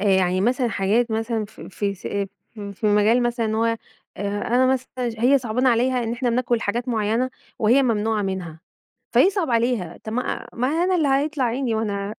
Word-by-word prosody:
آآ -, -, -2 dB
يعني 185 Hz, -2 st, +3 dB
مثلًا 245 Hz, +3 st, +1 dB
حاجات 220 Hz, +4 st, +1 dB
مثلًا 225 Hz, 0 st, -1 dB
في -, -, -12 dB
في 200 Hz, +1 st, -2 dB
س 190 Hz, -, -19 dB, 0.7 s
في 200 Hz, +2 st, -3 dB
مجال 210 Hz, +4 st, +4 dB
مثلًا 240 Hz, -1 st, 0 dB
إن 220 Hz, -, -1 dB
هو، 225 Hz, +1 st, +1 dB
أ 230 Hz, 0 st, +1 dB, 0.4 s
أنا 205 Hz, +6 st, +1 dB
مثلًا 260 Hz, -1 st, 0 dB, 0.2 s
ج 225 Hz, -, -5 dB
هي 270 Hz, +3 st, +5 dB
صعبانة 250 Hz, +2 st, 0 dB
عليها 250 Hz, +1 st, +2 dB
إن 225 Hz, -, -2 dB
إحنا 245 Hz, 0 st, -1 dB
بناكل 240 Hz, -1 st, +1 dB
حاجات 240 Hz, +5 st, -2 dB
معيّنة 225 Hz, +3 st, 0 dB, 0.3 s
وهي 240 Hz, +6 st, +4 dB
ممنوعة 220 Hz, -3 st, +1 dB
منها، 180 Hz, -5 st, -4 dB, 0.5 s
فيصعب 380 Hz, -6 st, +3 dB
عليها. 230 Hz, -6 st, 0 dB
طب 220 Hz, -, -5 dB
ما 250 Hz, +2 st, -2 dB
ما 250 Hz, +2 st, 0 dB
أنا 350 Hz, +5 st, +1 dB
اللي 310 Hz, -4 st, +2 dB
هيطلع 275 Hz, 0 st, +1 dB
عيني 240 Hz, 0 st, -1 dB
وأنا 205 Hz, -1 st, -2 dB
230 Hz, 185 wpm, -23 LUFS, 210-255 Hz, 0.7 s, هي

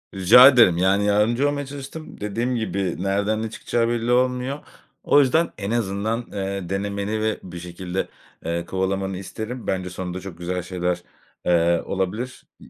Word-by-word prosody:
Rica 95 Hz, +7 st, +9 dB
ederim, 115 Hz, -10 st, +6 dB
yani, 95 Hz, +3 st, +3 dB
yardımcı 110 Hz, +6 st, +2 dB
olmaya 145 Hz, 0 st, -3 dB
çalıştım. 140 Hz, +3 st, -9 dB
Dediğim 115 Hz, +5 st, -1 dB
gibi 95 Hz, -6 st, -2 dB
nereden 100 Hz, +3 st, 0 dB
ne 115 Hz, -, -3 dB
çıkacağı 115 Hz, +1 st, -1 dB
belli 120 Hz, 0 st, 0 dB
olmuyor. 125 Hz, +2 st, +1 dB, 0.4 s
O -, -, +5 dB
yüzden 150 Hz, +5 st, +3 dB
en 100 Hz, +1 st, -4 dB
azından, 110 Hz, +1 st, -1 dB
eee, 100 Hz, -2 st, -4 dB
denemeni 100 Hz, +2 st, -2 dB
ve 110 Hz, 0 st, 0 dB
bir 90 Hz, -1 st, -8 dB
şekilde, 90 Hz, +2 st, -4 dB, 0.4 s
eee, 85 Hz, +1 st, -2 dB
kovalamanı 95 Hz, +1 st, -2 dB
isterim. 110 Hz, +5 st, -6 dB
Bence 95 Hz, -1 st, -1 dB
sonunda 90 Hz, 0 st, -5 dB
çok 95 Hz, -3 st, -9 dB
güzel 90 Hz, +1 st, -3 dB
şeyler, 90 Hz, -1 st, -2 dB, 0.4 s
eee, 85 Hz, -1 st, +3 dB
olabilir. 105 Hz, +7 st, -3 dB, 0.2 s
İ -, -, -15 dB
100 Hz, 155 wpm, -23 LUFS, 95-120 Hz, 0.4 s, Rica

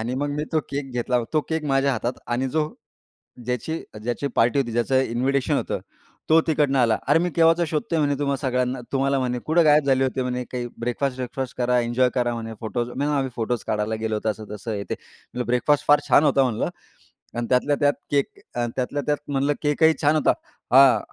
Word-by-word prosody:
आणि 120 Hz, +3 st, -2 dB
मग 145 Hz, +2 st, -1 dB
मी 150 Hz, +1 st, -2 dB
तो 160 Hz, -, +3 dB
केक 140 Hz, -1 st, -4 dB
घेतला. 125 Hz, 0 st, 0 dB
तो 155 Hz, -, +3 dB
केक 160 Hz, -1 st, -2 dB
माझ्या 135 Hz, -1 st, +2 dB
हातात 120 Hz, 0 st, -1 dB
आणि 125 Hz, +2 st, -1 dB
जो 150 Hz, +3 st, 0 dB, 0.8 s
ज्याची 125 Hz, +6 st, -2 dB, 0.3 s
ज्याची 120 Hz, +4 st, -2 dB
पार्टी 120 Hz, +4 st, +3 dB
होती, 125 Hz, -4 st, -1 dB
ज्याचं 120 Hz, +3 st, +2 dB
इन्व्हिटेशन 130 Hz, +2 st, 0 dB
होतं, -, -, -2 dB, 0.5 s
तो 160 Hz, -, +7 dB
तिकडनं 145 Hz, -3 st, +2 dB
आला. 115 Hz, -3 st, +3 dB
"अरे, 145 Hz, +3 st, +5 dB
मी 175 Hz, +1 st, 0 dB
केव्हाचा 165 Hz, +1 st, +4 dB
शोधतोय," 160 Hz, +1 st, -1 dB
म्हणे, 145 Hz, -1 st, +2 dB
"तुम्हा 140 Hz, -1 st, 0 dB
सगळ्यांना 125 Hz, -1 st, -1 dB
तुम्हाला," 135 Hz, 0 st, +1 dB
म्हणे, 125 Hz, -1 st, -1 dB
"कुठे 165 Hz, +2 st, +4 dB
गायब 150 Hz, -1 st, +5 dB
झाले 135 Hz, -1 st, +3 dB
होते," 130 Hz, 0 st, -1 dB
म्हणे, 125 Hz, 0 st, -2 dB
"काही 125 Hz, -1 st, -3 dB
ब्रेकफास्ट-वेकफास्ट 125 Hz, +1 st, -3 dB
करा, 125 Hz, 0 st, +2 dB
एन्जॉय 120 Hz, +2 st, +2 dB
करा," 120 Hz, -1 st, +1 dB
म्हणे, 115 Hz, -1 st, -5 dB
"फोटोज" 120 Hz, +2 st, -2 dB
नाही 120 Hz, -, -9 dB
म्हणे, 145 Hz, +2 st, 0 dB
"आम्ही 135 Hz, -1 st, -1 dB
फोटोज 115 Hz, 0 st, -2 dB
काढायला 110 Hz, +1 st, -1 dB
गेलो 110 Hz, 0 st, -1 dB
होतो, 110 Hz, +1 st, -1 dB
असं-तसं 105 Hz, +1 st, -6 dB
हे 100 Hz, -1 st, -3 dB
ते." -, -, -4 dB
म्हटलं, 125 Hz, 0 st, -9 dB
ब्रेकफास्ट 125 Hz, +4 st, +1 dB
फार 145 Hz, 0 st, +6 dB
छान 145 Hz, -, +6 dB
होता 140 Hz, -2 st, +4 dB
म्हटलं 120 Hz, -4 st, -1 dB, 0.7 s
आणि 120 Hz, 0 st, -2 dB
त्यातल्या 130 Hz, +3 st, +2 dB
त्यात 145 Hz, -1 st, +3 dB, 0.2 s
केक 140 Hz, -1 st, +2 dB, 0.3 s
आणि 120 Hz, -1 st, -1 dB
त्यातल्या 130 Hz, +3 st, -2 dB
त्यात 150 Hz, +1 st, +1 dB
म्हटलं, 140 Hz, +1 st, +1 dB
"केकही 160 Hz, +2 st, +3 dB
छान 150 Hz, 0 st, +3 dB
होता." 155 Hz, -, +3 dB, 0.4 s
हां, 135 Hz, -1 st, +7 dB
130 Hz, 200 wpm, -23 LUFS, 120-145 Hz, 0.8 s, तो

